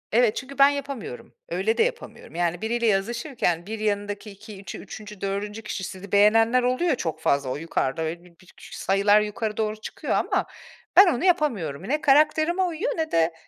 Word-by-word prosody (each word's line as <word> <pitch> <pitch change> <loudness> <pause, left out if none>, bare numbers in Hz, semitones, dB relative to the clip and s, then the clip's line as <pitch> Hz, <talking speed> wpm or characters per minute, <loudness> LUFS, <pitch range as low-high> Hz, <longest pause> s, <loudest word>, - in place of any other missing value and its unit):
Evet, 235 -1 +3
çünkü 275 +1 -7
ben 275 0 +7
yapamıyorum, 275 - -6 0.2
öyle 195 +7 0
de - - +5
yapamıyorum. 475 - -5
Yani 175 0 -1
biriyle 235 +1 0
yazışırken, 210 - 0
bir 220 +2 -5
yanındaki 205 0 -2
2 200 0 -12
üçü 200 - -7
3'üncü 210 -2 -10
4'üncü 205 +2 -3
kişi, 215 -2 -5
sizi 190 +1 -8
beğenenler 225 +4 +4
oluyor 255 +8 +1
ya 285 - +3
çok 160 -8 -4
fazla, 140 -3 +1
o 130 - -2
yukarıda, 155 -2 -2
öyle, 165 +2 -4
bi 180 - -17
bir 185 - -20
küçük - - -14
sayılar 200 +2 +3
yukarı 210 +1 -3
doğru 215 -1 -1
çıkıyor 215 - -5
ama - - +1 0.5
ben 390 - +10
onu 245 - -3
yapamıyorum. 235 - +1
Ne 300 +4 0
karakterime 310 +4 +3
uyuyor, 355 +5 -2
ne 320 -1 -2
de 165 0 +2
215 Hz, 185 wpm, -25 LUFS, 190-265 Hz, 0.5 s, ben